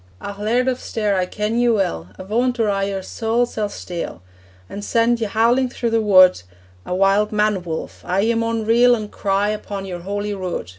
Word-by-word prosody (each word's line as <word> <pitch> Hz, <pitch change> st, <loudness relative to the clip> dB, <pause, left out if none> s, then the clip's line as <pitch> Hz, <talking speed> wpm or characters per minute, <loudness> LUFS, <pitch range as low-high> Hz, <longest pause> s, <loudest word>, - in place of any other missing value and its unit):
'Ah, 200 Hz, -, -6 dB
Laird 235 Hz, +5 st, +1 dB
of 255 Hz, -1 st, 0 dB
Stair, 210 Hz, -3 st, -1 dB
I 185 Hz, -1 st, 0 dB
ken 210 Hz, +4 st, -2 dB
ye 240 Hz, 0 st, +3 dB
weel! 190 Hz, -, 0 dB
Avaunt, 240 Hz, +6 st, -1 dB
or 215 Hz, -2 st, +2 dB
I 195 Hz, 0 st, 0 dB
your 195 Hz, -1 st, -3 dB
saul 230 Hz, +4 st, 0 dB
sall 215 Hz, -3 st, -3 dB
steal, 175 Hz, -, -6 dB, 0.4 s
An' 200 Hz, -, -7 dB
send 230 Hz, +2 st, +1 dB
ye 220 Hz, -, 0 dB
howling 235 Hz, +5 st, +2 dB
through 235 Hz, -1 st, -3 dB
the 225 Hz, 0 st, +2 dB
wood 185 Hz, -, +6 dB, 0.5 s
A 180 Hz, -, -2 dB
wild 195 Hz, +3 st, +3 dB
man 210 Hz, -2 st, +1 dB
wolf 165 Hz, -2 st, -6 dB
aye, 185 Hz, +2 st, 0 dB
ye 225 Hz, +3 st, +2 dB
maun 230 Hz, -1 st, -1 dB
reel 240 Hz, +2 st, +5 dB
An' 215 Hz, -2 st, -6 dB
cry 200 Hz, 0 st, 0 dB
upon 205 Hz, -2 st, -4 dB
your 180 Hz, -2 st, -6 dB
Holy 205 Hz, +3 st, -3 dB
Rood!' 185 Hz, -, -4 dB
210 Hz, 200 wpm, -20 LUFS, 195-230 Hz, 0.5 s, wood